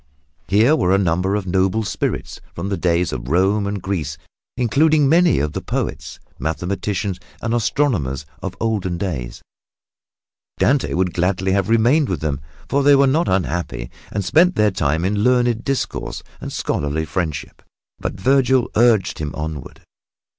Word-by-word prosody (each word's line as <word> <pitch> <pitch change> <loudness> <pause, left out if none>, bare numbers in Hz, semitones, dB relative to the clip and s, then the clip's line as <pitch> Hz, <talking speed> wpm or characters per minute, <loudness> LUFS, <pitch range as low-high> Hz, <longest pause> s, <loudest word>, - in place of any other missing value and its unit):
Here 115 +10 +4
were 95 - +2
a - - +4
number 95 +1 +1
of 105 -2 -2
noble 95 +4 +1
spirits 100 - -3
from 90 +4 -4
the 100 - 0
days 85 -2 0
of - - -5
Rome 95 +6 +2
and 100 0 -2
Greece, 80 -7 -3 0.4
including 145 +5 +3
many 170 +3 +4
of 75 +1 -1
the - - -3
poets, - - -4 0.2
mathematicians 95 +3 -2 0.2
and 115 0 -2
astronomers 110 - 0 0.2
of - - -5
olden 100 -6 -1
days. 80 -11 -4 1.1
Dante 140 +1 +2
would 90 0 0
gladly 95 +1 0
have 100 +1 +1
remained 120 +6 +3
with - - -2
them, 75 -3 -2 0.3
for 140 - +1
they 140 0 +6
were 140 0 +5
not 155 +6 +2
unhappy 90 -9 -2 0.2
and 100 -1 -2
spent 175 - +4
their 105 -1 +3
time 80 -1 0
in 100 +2 0
learned 120 -2 +2
discourse 135 -1 -3 0.2
and - - -6
scholarly 75 +2 -2
friendship, 80 -2 -4 0.4
but - - -3
Vergil 130 +2 +3
urged 115 -4 +3
him 75 -1 -4
onward. 75 -3 -6
100 Hz, 155 wpm, -20 LUFS, 85-120 Hz, 1.1 s, they